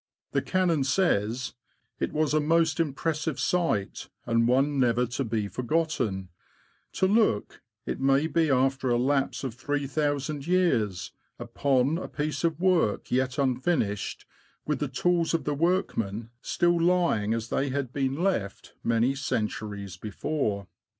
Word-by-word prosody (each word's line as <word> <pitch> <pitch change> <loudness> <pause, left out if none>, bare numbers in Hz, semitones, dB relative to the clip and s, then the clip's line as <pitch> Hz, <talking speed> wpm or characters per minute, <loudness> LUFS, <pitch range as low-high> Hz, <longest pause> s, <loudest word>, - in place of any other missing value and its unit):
The - - +1
Canon 175 -6 +1
says: 125 - +1 0.5
"It - - -1
was 155 -1 0
a 155 - +4
most 160 +1 +2
impressive 155 +1 -1
sight, 165 - 0 0.2
and 115 0 +2
one 135 +3 +2
never 125 -1 +3
to 120 +3 -3
be 110 -3 -1
forgotten, 120 - -1 0.6
to - - +1
look, 205 - +1 0.2
it - - -3
may 135 +2 +3
be 160 0 +1
after 135 0 +2
a 120 - +3
lapse 135 +3 0
of 130 -4 -3
3000 145 +2 -2
years, 125 - +1 0.3
upon 140 +3 +1
a - - -5
piece 150 +2 -3
of 165 -2 0
work 175 - +1
yet 130 0 +1
unfinished, 130 - 0 0.4
with 150 -3 -1
the 150 - -1
tools 170 +5 +1
of 165 - -1
the 150 - -1
workmen 120 - -1
still 175 -1 +1
lying 170 -12 +2
as 115 0 -4
they 140 - 0
had 130 -2 -3
been 135 -1 0
left 110 - -2
many 115 +3 +2
centuries 105 -7 -3
before.'' 105 - -2
135 Hz, 140 wpm, -27 LUFS, 115-160 Hz, 0.6 s, a